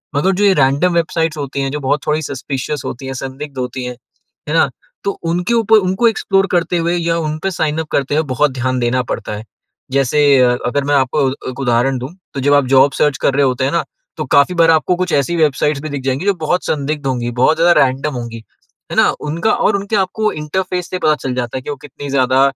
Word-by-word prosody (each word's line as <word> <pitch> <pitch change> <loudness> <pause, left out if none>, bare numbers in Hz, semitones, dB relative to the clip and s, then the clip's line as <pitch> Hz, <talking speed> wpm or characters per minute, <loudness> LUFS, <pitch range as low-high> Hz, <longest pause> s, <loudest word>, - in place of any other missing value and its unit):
मगर 180 +7 +2
जो 205 - 0
ये 200 - +5
रैंडम 140 +6 +2
वेबसाइट्स 165 -1 0
होती 140 -1 -3
हैं, 135 - -1
जो 150 - -3
बहुत 140 +1 0
थोड़ी 150 +1 +1
सस्पिशस 140 0 -4
होती 135 +2 -6
हैं, 135 - -4
संदिग्ध 135 +1 -7
होती 125 0 -4
हैं, 125 0 -5 0.5
है - - -1
ना? - - +4 0.3
तो 200 - 0 0.2
उनके 180 +6 0
ऊपर 225 -1 +4
उनको 195 +6 +2
एक्सप्लोर 195 -3 +1
करते 175 0 +1
हुए 170 +1 0
या 170 0 0
उनपे 155 +3 -2
साइन 155 -3 -1
अप 160 - -3
करते 140 +1 0
हुए 155 - +2
बहुत 145 +2 +2
ध्यान 130 0 -1
देना 125 +1 +1
पड़ता - - -5
है। 110 - -9 0.5
जैसे 135 +2 +1 0.5
अगर 140 +3 0
मैं 145 0 +2
आपको 135 +1 +2
अ, - - -3 0.2
एक 130 - -8
उदाहरण 125 +1 +1
दूँ, 130 - -5 0.2
तो 140 - -4
जब 145 +2 +3
आप 145 -2 +4
जॉब 135 +2 +6
सर्च 145 -3 +1
कर - - +2
रहे 140 - +3
होते 130 0 0
हैं 135 - 0
ना, 170 - +1 0.3
तो 155 - -3
काफ़ी 140 +6 +3
बार 165 -1 +5
आपको 160 +3 +2
कुछ 180 0 -2
ऐसी 140 +4 +1
वेबसाइट्स 150 -2 +1
भी 155 - -5
दिख 140 -2 -4
जाएँगी 135 +6 -1
जो 200 - +3
बहुत 180 +4 +1
संदिग्ध 145 0 -2
होंगी, 120 -2 -1
बहुत 125 +6 +2
ज़्यादा 170 +1 +5
रैंडम 135 +3 0
होंगी, 120 -1 -5 0.5
है - - -3
ना? - - +5
उनका 165 +8 0
और 205 - +2
उनके 200 +2 -3
आपको 210 +2 0
इंटरफ़ेस 180 +4 -3
से 185 - -3
पता 155 - +3
चल 135 -3 -4
जाता 125 0 -3
है - - -5
कि - - -8
वो 145 - -2
कितनी 145 0 -8
ज़्यादा 130 -1 +2
145 Hz, 235 wpm, -17 LUFS, 130-170 Hz, 0.5 s, जॉब